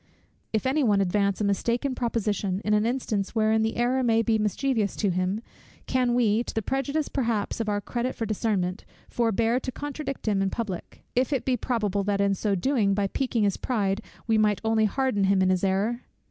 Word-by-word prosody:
If 220 +1 -1
any 275 +3 +2
one 205 -5 +3
advance 200 +1 +1
a - - 0
mistaken 235 +7 0
proposition, 210 -6 -1
in 210 - +2
an 210 +1 +3
instance 230 -5 -2
wherein 220 0 +3
the 220 0 0
error 245 +2 +2
may 230 -2 +3
be 225 -1 +2
mischievous 215 0 0
to 200 -3 0
him; 185 +4 -1 0.4
can 250 -2 +1
we, 230 -2 +3
to - - -7
the 220 - 0
prejudice 275 +5 -1
perhaps 230 -6 -1
of 225 -2 -1
our 205 0 +1
credit 240 +5 -3
for 225 - -2
discernment, 205 -3 -1 0.2
forbear 230 +1 +1
to 255 - -5
contradict 290 -2 -5
him 200 -2 +2
in 195 - +1
public, 195 -5 -5
if 255 +3 +2
it 260 -4 0
be 260 - +2
probable 210 -6 -1
that 200 -1 0
in 200 0 +3
so 200 +1 0
doing, 200 -1 +1
by 200 0 +1
piquing 245 -3 0
his 200 -2 +1
pride 205 -5 -1 0.2
we 225 -1 +2
might 210 -3 +2
only 220 -1 +3
harden 215 -2 +1
him 195 0 +3
in 185 - +3
his 185 0 0
error? 200 +5 +1
220 Hz, 200 wpm, -26 LUFS, 200-245 Hz, 0.4 s, one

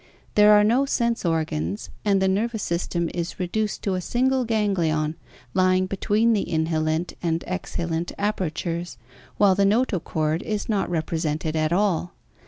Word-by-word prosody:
There 210 0 +7
are 210 0 +6
no 245 +6 +3
sense 235 -3 0
organs 105 - -2
and 200 -2 +3
the 190 - +2
nervous 215 +3 0
system 170 0 -1
is 170 +1 -4
reduced 210 +4 -2
to 195 - 0
a 185 - -1
single 255 +5 +1
ganglion 170 -9 0 0.4
lying 185 0 +3
between 210 +4 +1
the 205 - +1
inhalent 160 +1 0
and 165 -1 -1
exhalent 170 -2 -3
apertures, 175 -4 -2 0.4
while 200 -2 +5
the 200 +2 +2
notochord 180 -7 +1
is 210 -2 -3
not 205 -5 0
represented 160 -2 -2
at 155 0 +1
all. 180 -2 0
185 Hz, 145 wpm, -24 LUFS, 165-210 Hz, 0.4 s, There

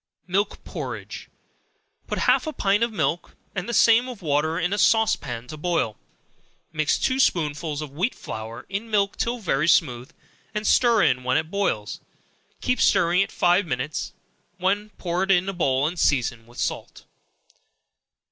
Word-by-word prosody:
Milk 195 +3 -1
Porridge. - - -7 0.8
Put - - -3
half - - +3
a 310 - -3
pint 200 -2 +1
of 235 0 +1
milk, 165 -4 -2 0.2
and 190 +3 -4
the - - -1
same 235 +2 +5
of 235 -7 -9
water, 155 +2 +1
in 180 +2 0
a 205 - -1
sauce 225 +2 +4
pan 120 -3 -7
to 155 - -7
boil; 150 -9 -1 0.8
mix 155 -2 +1
two 260 0 0
spoonsful 155 - 0
of 145 - -8
wheat 180 - -1
flour 110 +2 -7
in 200 +4 -4
milk 200 -2 +1
till 240 +1 -1
very 155 - 0
smooth, 125 -7 +2 0.5
and 210 0 -2
stir 235 -3 +4
in 125 0 +2
when 130 +2 +2
it 160 +1 -2
boils; 110 - -1 0.6
keep 250 -1 0
stirring 175 +2 +4
it 195 - -1
five 175 +2 +2
minutes, 130 +2 -3 0.4
when 200 +3 0
pour 175 0 -2
it 190 - -1
in 185 -1 +3
a 195 - -2
bowl 135 -6 +1
and 170 +3 -2
season 120 -5 +1
with 120 - -17
salt. - - -4
175 Hz, 165 wpm, -24 LUFS, 145-205 Hz, 0.8 s, same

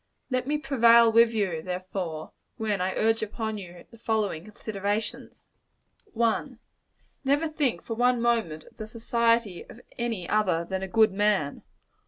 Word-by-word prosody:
Let 255 0 0
me 300 +1 +1
prevail 235 -5 +5
with 230 +1 +6
you, 195 -8 -1
therefore, 180 -3 -5 0.3
when 210 -4 -1
I 185 +1 -1
urge 225 +1 +2
upon 220 0 -3
you 175 -2 -11
the 230 - -16
following 215 -8 -1
considerations: 210 0 -4 0.7
1. 235 +3 0 0.7
Never 285 +4 +2
think 300 -6 -1
for 230 - -4
one 245 +1 +2
moment 225 -10 0
of - - -20
the 215 - -6
society 230 -3 0
of - - -12 0.2
any 225 -7 -2
other 185 -6 +1
than 190 +1 -3
a 190 - -3
good 220 +1 +4
man. 195 -7 0
220 Hz, 150 wpm, -27 LUFS, 190-235 Hz, 0.7 s, with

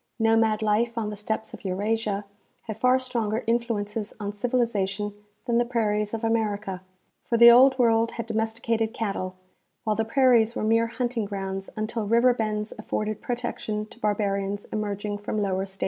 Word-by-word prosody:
Nomad 225 -1 +3
life 230 +3 +1
on 215 -2 -1
the - - -5
steppes 220 +2 -4
of - - -10
Eurasia 205 +2 -1 0.4
had 220 - -5
far 250 +4 +3
stronger 235 -4 -2
influences 225 -3 -1
on 205 -1 -4
civilization 210 -3 -1 0.3
than 235 -1 +2
the - - +4
prairies 210 -3 0
of 225 - -6
America, 210 -4 -1 0.5
for 235 - +1
the 235 +1 +10
old 260 +2 +7
world 230 -2 +3
had 230 - -4
domesticated 225 0 -1
cattle, 195 -4 -3 0.5
while 215 -1 0
the 225 - +1
prairies 235 -1 +3
were - - -2
mere 225 +1 +3
hunting 235 -1 -2
grounds 195 -1 -4
until 215 0 -3
river 235 +3 +5
bends 215 -2 -2
afibrded 215 0 -3
protection 235 -3 -3
to 225 - -16
barbarians 200 -2 -1
emerging 205 -1 -3
from 210 +1 -3
lower 195 -1 -1
stages. 190 0 -10
220 Hz, 160 wpm, -26 LUFS, 205-230 Hz, 0.5 s, the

